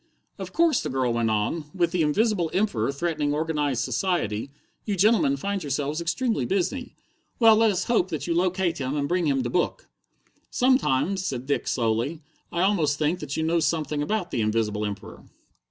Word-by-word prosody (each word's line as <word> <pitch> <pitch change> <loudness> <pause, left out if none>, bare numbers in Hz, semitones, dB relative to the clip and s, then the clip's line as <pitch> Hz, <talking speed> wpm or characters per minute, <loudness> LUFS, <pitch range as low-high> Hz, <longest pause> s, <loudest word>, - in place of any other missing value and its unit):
"Of - - -6
course," 335 -2 +3
the - - -3
girl 130 -2 0
went 115 -1 +1
on, 110 +9 -1
"with 170 -2 +1
the 180 -2 0
Invisible 180 +3 +1
Emperor 140 - +1
threatening 150 -1 -1
organized 150 -5 0
society, 125 - -1 0.3
you 205 - -2
gentlemen 190 -8 +3
find 200 +6 -2
yourselves 145 +1 -2
extremely 220 - 0
busy. 195 - -2 0.4
Well, 225 -2 +7
let 225 0 +4
us 190 -2 0
hope 220 -6 +1
that 155 -5 -4
you 170 - 0
locate 180 -1 0
him 135 +2 -2
and 140 -1 0
bring 175 0 0
him 135 -2 +1
to 120 - -2
book." 180 - -1 0.6
"Sometimes," 195 - +2
said 130 -7 -3
Dick 140 - -1
slowly, 120 +7 -1 0.3
"I 170 - -1
almost 165 -8 +2
think 155 +4 0
that 145 -4 -5
you 160 - 0
know 165 +1 +2
something 150 -2 0
about 180 +3 -2
the 115 - -1
Invisible 105 -1 0
Emperor." 100 - -8
160 Hz, 180 wpm, -25 LUFS, 135-185 Hz, 0.6 s, Well